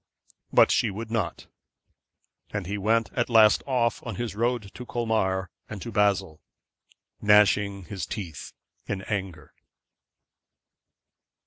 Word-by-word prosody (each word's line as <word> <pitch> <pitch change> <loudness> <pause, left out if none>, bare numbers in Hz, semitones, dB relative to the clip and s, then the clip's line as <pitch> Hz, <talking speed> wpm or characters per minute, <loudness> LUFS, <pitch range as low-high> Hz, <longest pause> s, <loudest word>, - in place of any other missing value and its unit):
But - - +6
she - - +2
would 110 +3 -6
not; 115 -3 -2 1.0
and 100 -3 -4
he 100 +4 -3
went 115 +3 +1
at 120 -1 0
last 110 -2 +6
off 120 -3 +1
on 115 -5 -5
his 120 +2 -3
road 115 -2 -1
to 125 - -8
Colmar 110 -7 -1 0.2
and 110 +2 -7
Basle, 95 -6 +1 0.8
gnashing 105 -1 +4
his 95 +2 -5
teeth 90 -9 -6 0.4
in 95 -2 -3
anger. 95 -7 -5
105 Hz, 115 wpm, -26 LUFS, 95-115 Hz, 1.0 s, But